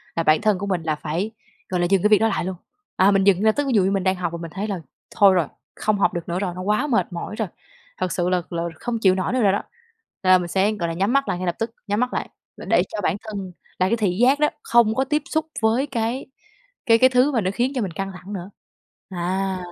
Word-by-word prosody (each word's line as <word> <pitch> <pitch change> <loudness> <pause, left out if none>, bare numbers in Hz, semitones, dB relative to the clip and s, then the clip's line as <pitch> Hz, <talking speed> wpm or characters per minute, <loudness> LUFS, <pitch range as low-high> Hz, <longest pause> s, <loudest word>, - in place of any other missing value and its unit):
là 165 - 0
bản 155 0 +4
thân 210 -3 +2
của 200 - -4
mình 180 -4 -1
là 155 -1 0
phải, 165 +8 -3 0.4
gọi 180 - -1
là, 175 - +2
dừng 195 -2 +3
cái 210 - +4
việc 210 - +6
đó 225 - +3
lại 195 -5 -1
luôn. 185 0 -3 0.4
À, 190 +2 +5
mình 195 -1 +3
dừng 200 0 +4
là 220 - +5
tức 290 +4 -2
ví 260 - 0
dụ 200 - +5
như 190 - +1
mình 195 -2 0
đang 190 0 +2
học 175 -2 -3
và 170 - -5
mình 165 -1 -7
thấy 205 +3 -2
là 195 -3 -3 0.4
thôi 200 -2 +6
rồi, 170 -5 +2 0.3
không 215 -1 0
học 175 - +2
được 175 -1 -5
nữa 175 +2 -1
rồi, 185 -3 -2
nó 185 - -5
quá 210 +9 +1
mệt 235 -7 0
mỏi 175 +5 -5
rồi, 220 -2 -2 0.5
thật 185 -1 -2
sự 175 0 0
là 180 -1 +1
là 170 -1 -2 0.2
không 235 -2 -3
chịu 190 -3 +4
nổi 190 +6 -1
nữa 255 - +1
rồi 200 -3 +4
đó, 200 - -1 0.6
là 185 0 +6
mình 180 -1 -3
sẽ, 195 +4 +2
gọi 195 -6 -2
là, - - -3
nhắm 195 +7 +1
mắt 275 0 +2
lại - - -1
ngay 185 - -3
lập 175 - 0
tức, 225 0 -2 0.2
nhắm 205 +2 0
mắt 250 0 0
lại - - -3 0.3
và - - -9
để - - +3
cho 210 - -4
bản 185 - +1
thân 200 -4 -6 0.3
là 185 - +3
cái 230 - +1
thị 195 -4 0
giác 260 +4 +4
đó, 300 - +3
không 235 -2 +3
có 265 - +2
tiếp 295 +2 0
xúc 315 0 -1
với 230 +5 +2
cái 240 -1 -2 0.6
cái 230 -1 +6
cái 255 - +6
thứ 255 +3 +3
mà 240 -5 +1
nó 185 -1 0
khiến 245 +5 0
cho 250 - 0
mình 195 -4 -2
căng 195 +4 -4
thẳng 185 +2 -9
nữa. 185 -1 -6 0.6
À, 190 +1 -2
195 Hz, 285 wpm, -22 LUFS, 180-225 Hz, 0.6 s, việc